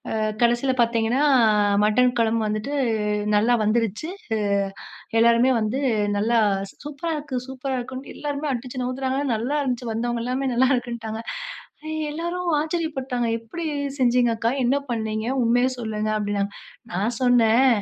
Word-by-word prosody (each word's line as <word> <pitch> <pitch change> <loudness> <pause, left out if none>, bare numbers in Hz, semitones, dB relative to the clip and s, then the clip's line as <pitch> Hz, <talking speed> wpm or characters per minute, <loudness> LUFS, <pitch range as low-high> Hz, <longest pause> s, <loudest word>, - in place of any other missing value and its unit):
அ - - 0 0.3
கடைசில 240 +3 +2
பார்த்தீங்கன்னா, 230 +2 +1 0.2
அ 205 -2 +3
மட்டன் 250 +3 +3
குழம்பு 225 0 +2
வந்துட்டு 215 +6 -3 0.6
நல்லா 230 +4 +4
வந்துருச்சு. 225 - 0 1.0
அ - - -29
எல்லோருமே 235 +3 +5
வந்து, 220 +5 -1 0.4
"நல்லா 230 +3 +2 0.5
சூப்பரா 295 +3 -4
இருக்கு, 260 -4 -4
சூப்பரா 265 0 -3
இருக்குன்னு" 260 +2 -8
எல்லாருமே 290 0 -3
அடிச்சு 255 +1 -4
நவுத்துறாங்க. 260 +1 -2
ஆனா 275 - -1
நல்லா 245 +7 -1
இருந்துச்சு, 245 -3 -2
வந்தவங்க 235 +1 -2
எல்லாமே 255 +2 -1
நல்லாருக்குன்ட்டாங்க. 240 -3 0 0.9
எல்லரும் 345 +3 -3
ஆச்சரியப்பட்டாங்க, 295 -6 -2
"எப்படி 230 +10 -7 0.3
செஞ்சீங்க 245 -2 +3
அக்கா? 225 +1 0
என்ன 250 +3 +2
பண்ணீங்க? 220 -1 -2 0.2
உண்மைய 240 +2 +3
சொல்லுங்க", 215 -3 -3
அப்படின்னாங்க. 205 -1 -1 0.4
நான் 200 +7 0
சொன்னேன், 245 0 +4
245 Hz, 130 wpm, -23 LUFS, 225-265 Hz, 1.0 s, எல்லோருமே